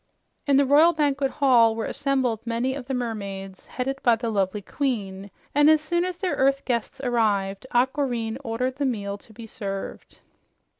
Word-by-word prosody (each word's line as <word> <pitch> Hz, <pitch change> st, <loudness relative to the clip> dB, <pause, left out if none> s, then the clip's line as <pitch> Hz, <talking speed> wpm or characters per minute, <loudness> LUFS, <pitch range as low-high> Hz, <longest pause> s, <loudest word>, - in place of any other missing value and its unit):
In 280 Hz, -1 st, +4 dB
the 280 Hz, -, +4 dB
royal 305 Hz, +5 st, +6 dB
banquet 285 Hz, -3 st, +1 dB
hall 240 Hz, -6 st, +4 dB
were 225 Hz, -, -3 dB
assembled 260 Hz, -5 st, 0 dB
many 235 Hz, +3 st, -1 dB
of 265 Hz, -2 st, -7 dB
the 270 Hz, -, -2 dB
mermaids, 200 Hz, -5 st, -5 dB
headed 270 Hz, +2 st, -3 dB
by 240 Hz, -2 st, +4 dB
the 230 Hz, 0 st, -3 dB
lovely 200 Hz, 0 st, -1 dB
queen, 200 Hz, -7 st, -3 dB, 0.2 s
and 295 Hz, +1 st, +5 dB
as 315 Hz, 0 st, +6 dB
soon 345 Hz, +3 st, -1 dB
as 365 Hz, -1 st, -3 dB
their 370 Hz, -1 st, -1 dB
earth 275 Hz, +1 st, +2 dB
guests 245 Hz, +2 st, -2 dB
arrived, 215 Hz, -4 st, 0 dB
Aquareine 245 Hz, -2 st, 0 dB
ordered 250 Hz, +2 st, -2 dB
the 285 Hz, -, 0 dB
meal 200 Hz, -4 st, -3 dB
to 220 Hz, -, -18 dB
be 225 Hz, +1 st, -10 dB
served. 195 Hz, -3 st, -6 dB
245 Hz, 170 wpm, -25 LUFS, 220-275 Hz, 0.2 s, royal